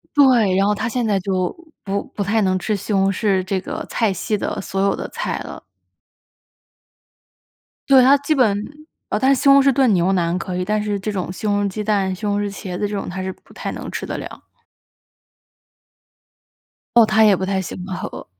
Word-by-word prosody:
对， 245 -9 +5
然 195 +1 +3
后 205 - +2
他 220 - -2
现 240 0 -1
在 205 -3 +1
就， 185 -1 -1 0.3
不 200 0 -2
不 205 - -1
太 210 +3 +1
能 185 -2 +1
吃 200 +4 -2
西 210 +1 -3
红 195 0 +3
柿 195 -1 0
这 190 +1 -2
个 185 - -6
菜 220 -4 +1
系 210 +4 -2
的 - - -3
所 195 0 -3
有 200 - +2
的 - - -6
菜 - - -3
了。 - - -8 2.3
对， 270 -2 +7
他 270 +3 +6
基 285 +2 0
本 220 -8 +2 0.5
呃， 210 - 0
但 265 +4 +4
是 265 - 0
西 - - 0
红 275 0 +8
柿 275 0 +4
炖 260 -4 +3
牛 180 0 +2
腩 175 -1 0
可 180 +1 -5
以， 180 - -2
但 210 +2 0
是 205 -1 -2
这 210 +2 -3
种 185 -3 -3
西 190 - -8
红 205 -1 +1
柿 - - 0
鸡 210 +2 -4
蛋， 200 -3 0
西 210 - -7
红 205 0 0
柿 205 - -1
茄 190 -2 -6
子 205 - 0
这 205 - -4
种， 200 - -4
他 185 +1 -5
是 190 0 -3
不 - - -18
太 - - -5
能 - - -7
吃 - - -4
得 - - -4
了。 - - -9 2.5
哦， 235 - +8
他 220 +1 +4
也 205 -2 +6
不 190 - -3
太 190 0 -1
喜 185 - -6
欢 190 - -6
喝。 - - -7
205 Hz, 235 characters per minute, -20 LUFS, 190-220 Hz, 2.5 s, 红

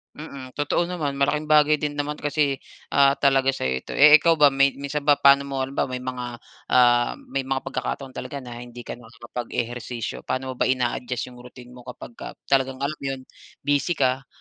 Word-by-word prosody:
Mm, 140 -4 -9
totoo 170 +4 0
naman. 150 -6 -2
Malaking 150 +2 0
bagay 150 0 +4
din 150 -1 -3
naman 145 +1 -3
kasi, 145 -2 0 0.3
ah, 140 -1 +5
talaga 135 -1 +2
sa'yo 65 - -1
ito. - - -10
Eh, 150 +2 +8
ikaw 165 +2 +3
ba, 145 -2 +6
may 140 0 +3
minsan 140 +1 -4
ba 145 - +7
paano 140 0 +5
mo 135 -1 -2
halimbawa, 135 +1 -1
may 125 -1 -5
mga 125 -1 -4 0.4
ah 120 -1 +4 0.2
may 135 -1 -2
mga 135 0 -1
pagkakataon 130 +1 -4
talaga 130 +2 -7
na 120 -1 -9
hindi 120 0 -10
ka 120 - -8
nakakapag-ehersisyo, 120 0 -6
paano 130 +1 -2
mo 130 - -5
ba - - +2
ina-adjust 125 -1 -1
yung 125 - -14
routine 125 0 -13
mo 125 0 -14
kapagka 120 -1 -9 0.2
talagang 135 -1 +1
alam 150 +2 -2
'yon 135 -1 -4 0.4
busy 145 +4 +1
ka 130 -2 0
135 Hz, 185 wpm, -24 LUFS, 125-145 Hz, 0.4 s, Eh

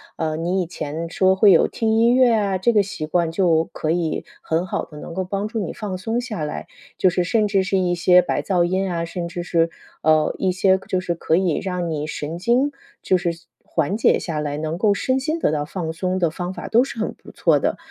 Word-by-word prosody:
呃， 155 -1 -2
你 180 +3 0
以 - - -2
前 165 0 -5
说 190 +2 +3
会 200 +1 +6
有 170 - +5
听 220 -1 0
音 235 +2 +4
乐 255 -2 +5
啊， 200 -3 +1
这 215 +6 +2
个 210 -3 +4
习 195 -6 -5
惯 170 +1 +1
就 165 -2 +2
可 155 - -1
以 165 -2 -1 0.2
很 165 +2 -1
好 185 - -3
地 150 - -13
能 - - -8
够 185 +2 -2
帮 200 +3 -3
助 225 - -3
你 190 -6 -3
放 200 -4 -5
松 225 +6 -2
下 215 -11 -4
来， 150 - -5 0.3
就 185 - +4
是 180 0 0
甚 215 +4 +2
至 200 -2 +2
是 195 +1 0
一 180 -1 +1
些 180 +1 +5
白 180 - -1
噪 180 -3 +1
音 185 +2 0
啊， 170 -1 -2
甚 170 +1 -4
至 175 0 -5
是， 165 -1 +1 0.3
呃， 155 -1 +3
一 190 - 0
些 190 +1 +3
就 185 - 0
是 175 -2 -1
可 160 -1 0
以 180 -3 +1
让 180 -3 -2
你 150 -1 -3
神 155 +1 -5
经 245 +9 +2 0.3
就 185 - +3
是 175 -1 -1 0.3
缓 170 +5 -1
解 230 - +4
下 160 -4 -4
来， 145 -1 -2
能 155 +2 -3
够 205 +2 +3
身 260 +6 0
心 310 +5 -1
得 325 - +1
到 150 -1 -1
放 160 +1 -4
松 185 +3 -2
的 170 -3 +2
方 180 +2 -4
法 - - -7
都 235 +3 +4
是 275 -3 -8
很 220 - -2
不 - - -15
错 - - +3
的。 - - -1
180 Hz, 260 characters per minute, -22 LUFS, 165-200 Hz, 0.3 s, 会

